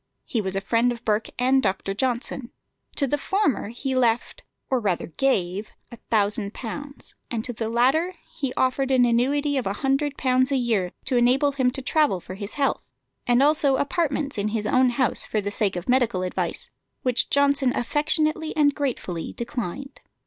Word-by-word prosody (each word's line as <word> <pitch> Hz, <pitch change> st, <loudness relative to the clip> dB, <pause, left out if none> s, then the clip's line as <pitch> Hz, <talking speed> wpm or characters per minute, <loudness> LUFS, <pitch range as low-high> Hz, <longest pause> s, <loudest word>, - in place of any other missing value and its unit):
He 230 Hz, -, -1 dB
was 190 Hz, -1 st, -3 dB
a 195 Hz, -, 0 dB
friend 230 Hz, +4 st, +2 dB
of 235 Hz, 0 st, -7 dB
Burke 215 Hz, 0 st, 0 dB
and 260 Hz, +2 st, +3 dB
Dr. 195 Hz, -2 st, -1 dB
Johnson. 245 Hz, +2 st, -2 dB, 0.5 s
To 280 Hz, -, +2 dB
the 290 Hz, +2 st, -1 dB
former 385 Hz, -, 0 dB
he 260 Hz, +3 st, -3 dB
left, 240 Hz, -2 st, +1 dB, 0.3 s
or 260 Hz, -, +1 dB
rather 195 Hz, -6 st, -1 dB
gave, 195 Hz, -, -1 dB, 0.2 s
a 235 Hz, -, -9 dB
thousand 210 Hz, -1 st, 0 dB
pounds, 280 Hz, +4 st, -7 dB, 0.2 s
and 225 Hz, -2 st, -2 dB
to 245 Hz, -, -2 dB
the 225 Hz, 0 st, -3 dB
latter 275 Hz, +10 st, +2 dB, 0.2 s
he 275 Hz, -3 st, -2 dB
offered 260 Hz, +1 st, +1 dB
an 255 Hz, -2 st, +4 dB
annuity 280 Hz, +5 st, +1 dB
of 255 Hz, -, -1 dB
a 195 Hz, -, 0 dB
hundred 275 Hz, +1 st, +1 dB
pounds 255 Hz, +1 st, +2 dB
a 275 Hz, -, +3 dB
year, 220 Hz, -8 st, 0 dB
to 255 Hz, -, +1 dB
enable 260 Hz, +4 st, +3 dB
him 265 Hz, -2 st, +1 dB
to 265 Hz, +1 st, -5 dB
travel 295 Hz, -, +2 dB
for 185 Hz, -, -9 dB
his 200 Hz, +2 st, -7 dB
health, 280 Hz, -1 st, +1 dB, 0.5 s
and 245 Hz, +2 st, +4 dB
also 290 Hz, -2 st, +3 dB
apartments 280 Hz, -, -1 dB
in 200 Hz, -, 0 dB
his 215 Hz, 0 st, -2 dB
own 255 Hz, +3 st, +4 dB
house 245 Hz, 0 st, -1 dB
for 215 Hz, -, 0 dB
the 205 Hz, 0 st, -3 dB
sake 205 Hz, -2 st, 0 dB
of 175 Hz, 0 st, -5 dB
medical 245 Hz, -7 st, +2 dB
advice, 180 Hz, -, -3 dB, 0.3 s
which 250 Hz, -2 st, +1 dB
Johnson 280 Hz, -2 st, +3 dB
affectionately 310 Hz, +4 st, +1 dB
and 290 Hz, -2 st, +4 dB
gratefully 235 Hz, -, -3 dB
declined. 240 Hz, +3 st, -5 dB
250 Hz, 180 wpm, -24 LUFS, 220-275 Hz, 0.5 s, an